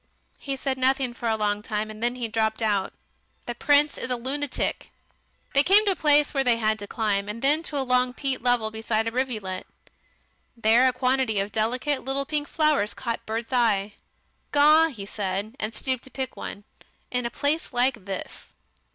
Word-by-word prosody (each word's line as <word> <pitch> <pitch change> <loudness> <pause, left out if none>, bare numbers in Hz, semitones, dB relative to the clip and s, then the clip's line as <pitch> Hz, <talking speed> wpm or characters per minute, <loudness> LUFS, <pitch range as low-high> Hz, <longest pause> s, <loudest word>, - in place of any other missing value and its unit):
He 275 -1 -3
said 265 0 -3
nothing 260 -1 +2
for 240 0 -5
a 220 - +2
long 210 -1 0
time, 215 0 -3
and 215 0 -11
then 240 +1 0
he 245 -2 -3
dropped 220 0 0
out, 205 -3 +1 0.5
"The 240 - -3
Prince 290 +4 +3
is - - -4
a 250 - +1
lunatic!" 270 +3 -2 0.6
They 280 - +6
came 400 +7 +5
to 400 - +3
a - - -1
place 295 -2 +3
where 275 -2 +1
they 245 -3 +3
had 215 -1 0
to 205 - -7
climb, 205 -2 -1
and 230 +4 -6
then 295 +4 +4
to 305 -3 -4
a 270 - 0
long 250 0 +2
peat 265 0 -2
level 240 -3 +1
beside 220 0 -1
a - - -1
rivulet. 220 -7 -3 0.9
There 230 +3 +5
a - - +4
quantity 255 -3 +1
of 200 +1 -2
delicate 250 +7 0
little 270 +1 -1
pink 295 0 -2
flowers 305 -10 +1
caught 235 -3 -4
Bert's 225 +3 -4
eye. 210 -5 +2 0.6
"Gaw!" 305 +3 +6
he 225 -11 -7
said, 200 +2 -3
and 215 +1 -3
stooped 260 -2 -1
to - - -13
pick 265 -1 -4
one. 205 - -7 0.5
"In 250 -1 0
a - - -5
place 290 +6 -1
like 245 -4 0
this." 195 -2 -6
245 Hz, 195 wpm, -25 LUFS, 220-270 Hz, 0.9 s, They